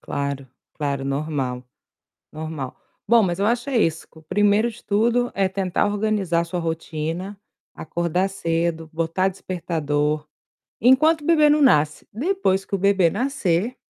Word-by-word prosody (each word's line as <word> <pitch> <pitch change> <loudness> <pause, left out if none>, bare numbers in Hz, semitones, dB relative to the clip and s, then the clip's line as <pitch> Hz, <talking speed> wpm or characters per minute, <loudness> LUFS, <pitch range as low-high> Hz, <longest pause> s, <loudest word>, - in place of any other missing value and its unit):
Claro, 140 -2 -4 0.3
claro, 140 -2 -2
normal. 135 -3 -2 0.7
Normal. 155 -4 -6 0.3
Bom, 235 -1 +5
mas 175 -1 -1
eu 200 - +1
acho 240 +3 0
é 265 - +1
isso, 165 -7 0
que 160 - -17
o - - -18
primeiro 205 +7 +2
de 235 0 -13
tudo 235 +4 +1
é 195 -1 +1
tentar 190 -1 0
organizar 205 -5 0
sua 170 +1 -4
rotina, 165 +3 -4 0.4
acordar 170 +4 -1
cedo, 165 -3 -2
botar 165 +4 0
despertador, 155 -5 -2 0.5
enquanto 300 +7 +4
o - - -10
bebê 305 -2 +5
não 295 0 +4
nasce, 150 - +3
depois 250 - 0
que 195 - -16
o - - 0
bebê 195 -2 +3
nascer 215 -2 -1
180 Hz, 145 wpm, -22 LUFS, 160-215 Hz, 0.7 s, Bom